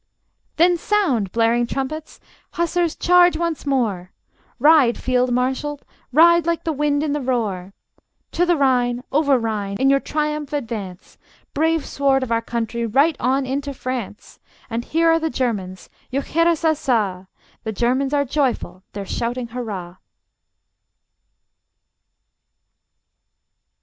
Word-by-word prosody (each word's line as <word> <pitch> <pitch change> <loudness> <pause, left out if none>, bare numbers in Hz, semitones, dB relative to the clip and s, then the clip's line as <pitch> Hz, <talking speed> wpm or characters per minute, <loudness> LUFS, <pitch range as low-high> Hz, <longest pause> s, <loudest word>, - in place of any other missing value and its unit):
Then 350 +2 +4
sound, 300 - 0
blaring 235 +1 +2
trumpets! 275 +5 -5 0.3
Hussars, 340 -1 0
charge 355 -1 +4
once 335 -3 -3
more! 210 -10 -1 0.5
Ride, 280 -2 +5
field 250 0 0
marshal, 265 +4 -1 0.3
ride 340 +3 +5
like 335 -1 0
the 325 - -1
wind 290 0 0
in 300 -2 -1
the 295 - -2
roar! 205 -7 -2 0.6
To 345 - +1
the 350 -1 +3
Rhine, 250 -3 +1
over 285 -1 +3
Rhine, 210 -4 -3
in 270 +1 +4
your 275 - +4
triumph 300 0 -3
advance! 215 -9 -6 0.3
Brave 320 0 +1
sword 270 -1 +1
of 245 - -5
our 230 0 +2
country, 235 0 -3
right 275 +8 +2
on 265 +3 +1
into 280 +1 -3
France! 250 -5 -6 0.3
And 230 +1 -3
here 330 +1 +2
are 325 - +3
the 320 0 -1
Germans: 200 -10 -3 0.2
juchheirassassa! 275 - 0 0.4
The 220 - -3
Germans 255 +5 0
are 285 -1 +1
joyful; 260 -8 -1
they're 200 -1 -5
shouting 240 +4 -3
hurrah! 200 -8 -6
265 Hz, 125 wpm, -21 LUFS, 230-305 Hz, 0.6 s, Ride